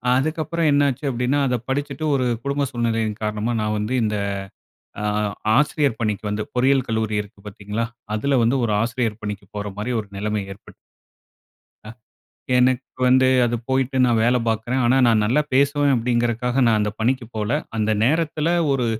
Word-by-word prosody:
அதுக்கப்பறம் 155 Hz, +3 st, 0 dB
என்னாச்சு 145 Hz, -1 st, +1 dB
அப்படீன்னா, 125 Hz, +3 st, 0 dB
அதை 125 Hz, -1 st, +1 dB
படிச்சுட்டு 140 Hz, +2 st, -3 dB
ஒரு 130 Hz, -2 st, 0 dB, 0.2 s
குடும்ப 140 Hz, 0 st, 0 dB
சூழ்நிலையின் 115 Hz, -3 st, -1 dB
காரணமா 105 Hz, +2 st, -1 dB
நா 105 Hz, -, -1 dB
வந்து 105 Hz, +5 st, -2 dB
இந்த 105 Hz, -1 st, -1 dB, 0.9 s
ஆ -, -, -3 dB, 0.5 s
ஆசிரியர் 145 Hz, -3 st, +1 dB
பணிக்கு 105 Hz, -2 st, -2 dB
வந்து 105 Hz, +1 st, -2 dB
பொறியியல் 130 Hz, +1 st, +3 dB
கல்லூரி 110 Hz, -2 st, -1 dB
இருக்கு 100 Hz, 0 st, -18 dB
பார்த்தீங்களா? 105 Hz, +3 st, -4 dB, 0.3 s
அதுல 135 Hz, +6 st, +1 dB
வந்து 120 Hz, +4 st, +2 dB
ஒரு 110 Hz, -, 0 dB
ஆசிரியர் 115 Hz, -2 st, -2 dB
பணிக்கு 105 Hz, -1 st, -5 dB
போற 105 Hz, 0 st, -3 dB
மாரி 105 Hz, +4 st, -3 dB
ஒரு 105 Hz, -, -10 dB
நெலைமை 105 Hz, +1 st, -2 dB
ஏற்பட்டது. 100 Hz, -, -15 dB, 1.1 s
அ. 105 Hz, -, -10 dB, 0.7 s
எனக்கு 130 Hz, +1 st, 0 dB
வந்து 130 Hz, +1 st, +5 dB, 0.2 s
அது 120 Hz, 0 st, -1 dB
போயிட்டு 130 Hz, 0 st, 0 dB
நான் 115 Hz, -2 st, +2 dB
வேலை 125 Hz, +1 st, +3 dB
பார்க்கிறேன். 115 Hz, +4 st, -1 dB
ஆனா, 125 Hz, +2 st, +3 dB
"நா 115 Hz, -, +5 dB
நல்லா 135 Hz, +8 st, +2 dB
பேசுவேன்." 140 Hz, +1 st, +3 dB
அப்படீங்கறக்காக 120 Hz, +2 st, 0 dB
நா 115 Hz, -, +4 dB
அந்த 105 Hz, 0 st, 0 dB
பணிக்குப் 120 Hz, 0 st, -1 dB
போல. 105 Hz, 0 st, -2 dB, 0.3 s
அந்த 110 Hz, 0 st, 0 dB
நேரத்தில 155 Hz, +3 st, +1 dB, 0.2 s
ஒரு 130 Hz, -3 st, 0 dB
120 Hz, 160 wpm, -22 LUFS, 110-135 Hz, 1.1 s, வந்து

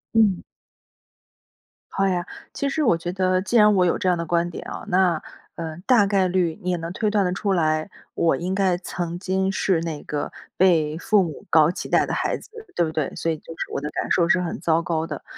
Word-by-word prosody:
嗯。 210 Hz, -5 st, +3 dB, 1.5 s
好 195 Hz, -, +1 dB
呀。 180 Hz, -2 st, 0 dB, 0.3 s
其 280 Hz, -, -1 dB
实 310 Hz, +3 st, 0 dB
我 200 Hz, -, +3 dB
觉 175 Hz, +1 st, -4 dB
得 185 Hz, 0 st, +1 dB
既 205 Hz, +5 st, -3 dB
然 210 Hz, -1 st, +6 dB
我 185 Hz, -1 st, +4 dB
有 175 Hz, -, +2 dB
这 185 Hz, -, 0 dB
样 180 Hz, -, +2 dB
的 170 Hz, -, -3 dB
观 170 Hz, +1 st, +1 dB
点 175 Hz, -, -8 dB
哦， -, -, -7 dB
那， 180 Hz, -4 st, +2 dB, 0.3 s
呃， 160 Hz, -2 st, -5 dB
大 235 Hz, -6 st, +5 dB
概 195 Hz, -2 st, +2 dB
率 175 Hz, -3 st, 0 dB
你 180 Hz, -, -1 dB
也 180 Hz, -, 0 dB
能 165 Hz, 0 st, -5 dB
推 215 Hz, +2 st, 0 dB
断 205 Hz, -2 st, +2 dB
得 180 Hz, -, 0 dB
出 195 Hz, +2 st, -1 dB
来， 155 Hz, -1 st, +1 dB, 0.3 s
我 165 Hz, -, +2 dB
应 185 Hz, +2 st, -3 dB
该 190 Hz, -3 st, +2 dB
曾 175 Hz, -1 st, -5 dB
经 190 Hz, +1 st, 0 dB
是 190 Hz, -2 st, +1 dB
那 160 Hz, -3 st, -4 dB
个 145 Hz, -1 st, -4 dB, 0.3 s
被 160 Hz, -5 st, +3 dB
父 205 Hz, +4 st, +3 dB
母 160 Hz, -4 st, -7 dB
高 155 Hz, -1 st, +5 dB
期 -, -, -6 dB
待 -, -, +3 dB
的 -, -, -4 dB
孩 -, -, 0 dB
子， -, -, -16 dB, 0.3 s
对 175 Hz, -, +2 dB
不 160 Hz, -, -4 dB
对？ 155 Hz, -3 st, -2 dB
所 165 Hz, -, -1 dB
以 160 Hz, -, -3 dB
就 165 Hz, -, -11 dB
是 -, -, -5 dB
我 -, -, -2 dB
的 150 Hz, -, -3 dB
感 -, -, -3 dB
受 170 Hz, -2 st, +3 dB
是 180 Hz, -, +4 dB
很 175 Hz, -, -4 dB
糟 165 Hz, 0 st, +2 dB
糕 160 Hz, -1 st, -1 dB
的， 150 Hz, -3 st, -6 dB
175 Hz, 250 characters per minute, -23 LUFS, 165-190 Hz, 1.5 s, 然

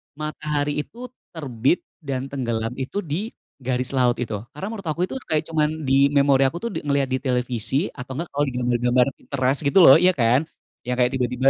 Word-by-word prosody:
matahari 150 Hz, -1 st, -2 dB
itu 240 Hz, +10 st, -7 dB, 0.2 s
terbit 135 Hz, 0 st, 0 dB, 0.2 s
dan 135 Hz, -4 st, -4 dB
tenggelam 115 Hz, -4 st, -2 dB
itu 180 Hz, +10 st, -3 dB
di 175 Hz, +9 st, -3 dB, 0.3 s
garis 125 Hz, 0 st, -1 dB
laut 125 Hz, -3 st, +2 dB
itu. 110 Hz, -3 st, -4 dB, 0.2 s
Karena 190 Hz, +7 st, -5 dB
menurut 195 Hz, -6 st, -7 dB
aku 160 Hz, +3 st, -1 dB
itu -, -, -7 dB
kayak 155 Hz, 0 st, +1 dB
cuman 155 Hz, 0 st, 0 dB
di 135 Hz, +1 st, +5 dB
memori 140 Hz, -1 st, +4 dB
aku 165 Hz, +6 st, -4 dB
tuh 235 Hz, -, -1 dB
ngelihat 140 Hz, -2 st, 0 dB
di 130 Hz, -, +1 dB
televisi 125 Hz, -, -1 dB
atau 130 Hz, 0 st, -8 dB
enggak 170 Hz, +3 st, -4 dB
kalau 145 Hz, +1 st, +1 dB
di 130 Hz, -, -4 dB
gambar-gambar 125 Hz, 0 st, +2 dB
Pinterest 135 Hz, 0 st, 0 dB
gitu 190 Hz, -, +4 dB
loh, 135 Hz, -, +10 dB
ya 180 Hz, +1 st, +5 dB
kan? 125 Hz, +5 st, +2 dB, 0.4 s
Yang 125 Hz, -, 0 dB
kayak 125 Hz, -, +1 dB
tiba-tiba 125 Hz, +1 st, +2 dB
135 Hz, 190 wpm, -23 LUFS, 125-155 Hz, 0.4 s, loh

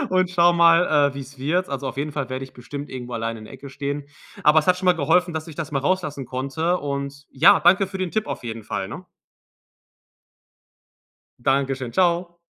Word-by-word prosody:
und 185 Hz, -1 st, +2 dB
schaue 175 Hz, -1 st, +4 dB
mal, 165 Hz, -4 st, +5 dB
äh, -, -, -17 dB
wie's 140 Hz, 0 st, -9 dB
wird. 170 Hz, +8 st, 0 dB
Also, 140 Hz, 0 st, -4 dB
auf 130 Hz, -, -5 dB
jeden 145 Hz, +2 st, -2 dB
Fall 140 Hz, -3 st, -3 dB
werde 130 Hz, +1 st, -3 dB
ich 130 Hz, -, -15 dB
bestimmt 140 Hz, +4 st, -8 dB
irgendwo 125 Hz, -1 st, -7 dB
alleine 115 Hz, 0 st, -3 dB
in 110 Hz, -, -11 dB
der -, -, -12 dB
Ecke 140 Hz, -, -10 dB
stehen. 140 Hz, +1 st, -4 dB, 0.3 s
Aber 150 Hz, +1 st, +6 dB
es 155 Hz, -, 0 dB
hat 180 Hz, -1 st, +4 dB
schon 185 Hz, 0 st, -4 dB
mal 180 Hz, -, +7 dB
geholfen, 175 Hz, +4 st, +2 dB
dass 160 Hz, +1 st, -4 dB
ich 165 Hz, -, -10 dB
das 160 Hz, -1 st, -5 dB
mal 140 Hz, -, 0 dB
rauslassen 145 Hz, -3 st, -1 dB
konnte. 150 Hz, +8 st, -1 dB
Und 140 Hz, -1 st, -5 dB
ja, 180 Hz, +9 st, +6 dB
danke 190 Hz, +2 st, +5 dB
für 190 Hz, 0 st, -7 dB
den 185 Hz, -2 st, -2 dB
Tipp 215 Hz, +3 st, -1 dB
auf -, -, -5 dB
jeden 115 Hz, -2 st, -6 dB
Fall, 95 Hz, -2 st, -4 dB
ne? -, -, -8 dB, 2.4 s
Danke 135 Hz, +1 st, +2 dB
schön. 130 Hz, -2 st, -6 dB
Tschau. 175 Hz, +2 st, +1 dB
145 Hz, 210 wpm, -23 LUFS, 135-175 Hz, 2.4 s, mal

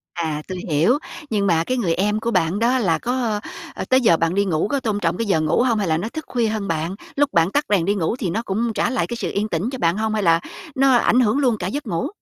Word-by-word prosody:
À, 155 Hz, -3 st, -2 dB
tôi 185 Hz, -1 st, -5 dB
hiểu. 165 Hz, -, +3 dB, 0.3 s
Nhưng 200 Hz, -3 st, 0 dB
mà 165 Hz, -2 st, +3 dB
cái 255 Hz, +7 st, -2 dB
người 175 Hz, -8 st, +1 dB
em 210 Hz, +4 st, 0 dB
của 235 Hz, +1 st, -2 dB
bạn 180 Hz, +1 st, +1 dB
đó 250 Hz, +3 st, +2 dB
là 175 Hz, -8 st, +1 dB
có, 240 Hz, -4 st, -1 dB, 0.4 s
ơ, -, -, -4 dB
tới 260 Hz, 0 st, +4 dB
giờ 170 Hz, -8 st, +4 dB
bạn 165 Hz, +1 st, 0 dB
đi 200 Hz, 0 st, +2 dB
ngủ 165 Hz, +1 st, 0 dB
có 280 Hz, -, -1 dB
tôn 215 Hz, -4 st, -2 dB
trọng -, -, 0 dB
cái 230 Hz, -2 st, -2 dB
giờ 160 Hz, -5 st, +2 dB
ngủ 155 Hz, +8 st, +2 dB
hông 230 Hz, -4 st, +1 dB
hay 195 Hz, -, -1 dB
là 160 Hz, 0 st, +2 dB
nó 210 Hz, +7 st, -3 dB
thức 315 Hz, +3 st, -7 dB
khuya 235 Hz, -3 st, 0 dB
hơn 215 Hz, -2 st, -2 dB
bạn? 165 Hz, +3 st, -2 dB, 0.2 s
Lúc 290 Hz, 0 st, +1 dB
bạn 170 Hz, +3 st, +3 dB
tắt 290 Hz, -, +1 dB
đèn 190 Hz, -5 st, +2 dB
đi 200 Hz, +1 st, +1 dB
ngủ 185 Hz, +4 st, -1 dB
thì 205 Hz, -9 st, -3 dB
nó 220 Hz, +6 st, -1 dB
cũng 225 Hz, +4 st, -1 dB
trả 235 Hz, -, 0 dB
lại 260 Hz, -, -1 dB
cái 235 Hz, -, -4 dB
sự -, -, -3 dB
yên 210 Hz, +2 st, -1 dB
tĩnh 175 Hz, +8 st, -1 dB
cho 260 Hz, -, -5 dB
bạn 170 Hz, +3 st, +1 dB
hông 220 Hz, 0 st, -1 dB
hay 210 Hz, -2 st, 0 dB
là 165 Hz, -1 st, +4 dB, 0.4 s
nó 270 Hz, 0 st, +4 dB
ảnh 240 Hz, +1 st, +3 dB
hưởng 235 Hz, +2 st, +3 dB
luôn 245 Hz, -6 st, +2 dB
cả 180 Hz, -, -3 dB
giấc 280 Hz, +4 st, -4 dB
ngủ? 170 Hz, -3 st, -1 dB
210 Hz, 295 wpm, -21 LUFS, 170-235 Hz, 0.4 s, tới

